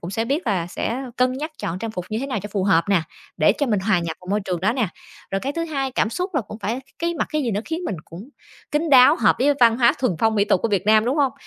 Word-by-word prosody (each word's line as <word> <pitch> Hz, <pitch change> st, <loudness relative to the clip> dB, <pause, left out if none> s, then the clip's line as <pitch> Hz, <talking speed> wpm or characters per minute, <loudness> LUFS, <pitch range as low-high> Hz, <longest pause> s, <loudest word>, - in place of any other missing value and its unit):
cũng 175 Hz, -, -6 dB
sẽ 225 Hz, +3 st, -1 dB
biết 280 Hz, +3 st, -2 dB
là 185 Hz, -6 st, 0 dB
sẽ 235 Hz, +8 st, -3 dB
cân 255 Hz, 0 st, +2 dB
nhắc 300 Hz, +5 st, -4 dB
chọn 170 Hz, +2 st, -4 dB
trang 225 Hz, +3 st, -4 dB
phục 180 Hz, -5 st, -5 dB
như 215 Hz, -, -1 dB
thế 270 Hz, -, -3 dB
nào 260 Hz, -5 st, -2 dB
cho 205 Hz, -, -6 dB
phù 195 Hz, -3 st, 0 dB
hợp 180 Hz, -4 st, +3 dB
nè, 195 Hz, -4 st, +3 dB, 0.3 s
để 155 Hz, +3 st, +4 dB
cho 285 Hz, -, +1 dB
mình 210 Hz, -5 st, +1 dB
hòa 190 Hz, -2 st, +2 dB
nhập 170 Hz, -1 st, -4 dB
vào 180 Hz, -, -16 dB
môi 205 Hz, +1 st, +1 dB
trường 180 Hz, -3 st, -3 dB
đó 210 Hz, +5 st, +2 dB
nè. 245 Hz, -6 st, 0 dB, 0.4 s
Rồi 195 Hz, -, -1 dB
cái 275 Hz, +5 st, -3 dB
thứ 335 Hz, +2 st, -2 dB
hai, 275 Hz, -5 st, -2 dB
cảm 220 Hz, -, 0 dB
xúc 360 Hz, -, -4 dB
là 290 Hz, -, +2 dB
cũng 215 Hz, -1 st, -9 dB
phải 225 Hz, +5 st, -3 dB, 0.2 s
cái 340 Hz, 0 st, -1 dB
mặc 320 Hz, -, -1 dB
cái 305 Hz, -1 st, 0 dB
gì 245 Hz, -, -1 dB
nó 205 Hz, 0 st, -1 dB
khiến 325 Hz, +1 st, -3 dB
mình 190 Hz, -, -3 dB
cũng 185 Hz, +9 st, -11 dB, 0.4 s
kín 305 Hz, +2 st, 0 dB
đáo, 255 Hz, -2 st, +7 dB
hợp 225 Hz, -, +3 dB
với 285 Hz, +3 st, +3 dB
văn 230 Hz, -1 st, +6 dB
hóa, 235 Hz, -2 st, +5 dB
thuần 255 Hz, -7 st, +1 dB
phong 220 Hz, +3 st, +2 dB
mỹ 200 Hz, -1 st, +3 dB
tục 185 Hz, -, +2 dB
của 230 Hz, -, +1 dB
Việt 200 Hz, -2 st, 0 dB
Nam, 215 Hz, 0 st, +5 dB
đúng 255 Hz, +5 st, 0 dB
hông? 275 Hz, -5 st, +2 dB
225 Hz, 310 wpm, -22 LUFS, 195-270 Hz, 0.4 s, đáo